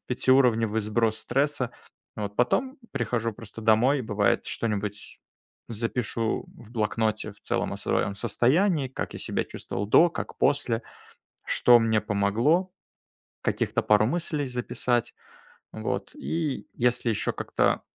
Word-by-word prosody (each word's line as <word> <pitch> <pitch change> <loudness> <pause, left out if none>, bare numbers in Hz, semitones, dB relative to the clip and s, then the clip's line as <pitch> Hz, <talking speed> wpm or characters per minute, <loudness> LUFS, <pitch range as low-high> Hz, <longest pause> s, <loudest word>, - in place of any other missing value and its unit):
пятиуровневый 120 -4 +3
сброс 110 +1 0
стресса. 135 +1 0 0.5
Вот. 100 -1 -4
Потом 260 - +1
прихожу 115 0 -1
просто 115 0 -11
домой, 115 +6 +4
и - - -3
бывает, 105 -3 +1
что-нибудь 105 -2 -3 0.5
запишу 115 0 -2
в 115 -3 -15
блокноте 110 -1 -1
в 100 - -23
целом - - -2
о - - -4
своем 100 - -1
состоянии. 135 - +2
Как 130 - -5
я - - -5
себя - - -1
чувствовал 100 - -5
до, 170 +10 +6
как - - -6
после. 125 -5 +1 0.6
Что 120 -1 +6
мне 110 -1 +2
помогло, 110 - +1 0.7
каких-то - - 0
пару 105 0 +4
мыслей 150 +1 -1
записать. 125 -1 -1 0.6
Вот. - - -3
И 160 -5 -3
если 125 0 +1
еще 110 - 0
как-то - - 0
115 Hz, 125 wpm, -26 LUFS, 110-130 Hz, 0.7 s, до